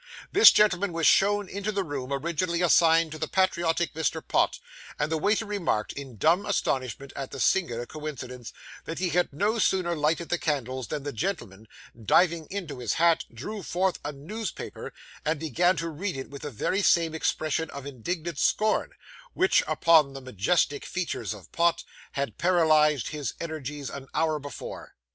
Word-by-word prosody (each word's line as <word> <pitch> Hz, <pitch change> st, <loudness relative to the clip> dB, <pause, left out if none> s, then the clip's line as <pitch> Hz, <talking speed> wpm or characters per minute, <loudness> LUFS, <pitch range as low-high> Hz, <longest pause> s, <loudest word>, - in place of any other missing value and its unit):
This 410 Hz, -, +9 dB
gentleman 200 Hz, -3 st, +3 dB
was 165 Hz, -1 st, 0 dB
shown 205 Hz, 0 st, +4 dB
into 200 Hz, +3 st, -3 dB
the 200 Hz, -1 st, -1 dB
room 140 Hz, -5 st, -5 dB
originally 170 Hz, +4 st, -1 dB
assigned 165 Hz, -1 st, +4 dB
to 155 Hz, -, -7 dB
the 155 Hz, -, -2 dB
patriotic 170 Hz, -2 st, +1 dB
Mr. 160 Hz, -3 st, -1 dB
Pott; -, -, +2 dB, 0.4 s
and 150 Hz, +2 st, -1 dB
the 160 Hz, -, +1 dB
waiter 210 Hz, +6 st, +1 dB
remarked, 195 Hz, -, -1 dB
in 135 Hz, -5 st, -8 dB
dumb 170 Hz, -, +3 dB
astonishment 135 Hz, -, -2 dB
at 135 Hz, -1 st, -5 dB
the -, -, -8 dB
singular 120 Hz, -11 st, +1 dB
coincidence, 130 Hz, -5 st, -7 dB, 0.3 s
that 165 Hz, -, -5 dB
he 185 Hz, -1 st, 0 dB
had 175 Hz, +2 st, +1 dB
no 205 Hz, +10 st, 0 dB
sooner 180 Hz, -4 st, +1 dB
lighted 160 Hz, +2 st, 0 dB
the 175 Hz, -, 0 dB
candles 130 Hz, -4 st, -2 dB
than 150 Hz, -3 st, -4 dB
the 145 Hz, 0 st, -4 dB
gentleman, 110 Hz, -, -4 dB, 0.4 s
diving 165 Hz, -, +3 dB
into 175 Hz, -9 st, -5 dB
his 120 Hz, -3 st, -1 dB
hat, 170 Hz, 0 st, +3 dB
drew 195 Hz, -, -6 dB
forth 185 Hz, +1 st, -1 dB
a 145 Hz, -, -3 dB
newspaper, 190 Hz, +10 st, -6 dB, 0.3 s
and 155 Hz, 0 st, 0 dB
began 170 Hz, +5 st, +2 dB
to 165 Hz, +1 st, -3 dB
read 170 Hz, +2 st, -4 dB
it 135 Hz, -, -7 dB
with 140 Hz, -, -9 dB
the 150 Hz, -, -5 dB
very 165 Hz, -, -1 dB
same 165 Hz, -4 st, +3 dB
expression 160 Hz, 0 st, -1 dB
of 140 Hz, -1 st, -8 dB
indignant 155 Hz, +4 st, -4 dB
scorn, 215 Hz, 0 st, +1 dB, 0.4 s
which, 375 Hz, +1 st, +4 dB
upon 155 Hz, -2 st, +4 dB
the 135 Hz, -, -7 dB
majestic 130 Hz, -, 0 dB
features 160 Hz, -, -3 dB
of 105 Hz, -4 st, -9 dB
Pott, 170 Hz, 0 st, +2 dB, 0.3 s
had 140 Hz, -6 st, -3 dB
paralysed 155 Hz, -6 st, +3 dB
his 145 Hz, -5 st, -4 dB
energies 150 Hz, -3 st, -5 dB
an 135 Hz, -1 st, -8 dB
hour 155 Hz, -1 st, +1 dB
before. 145 Hz, -1 st, -8 dB
160 Hz, 170 wpm, -27 LUFS, 140-180 Hz, 0.4 s, This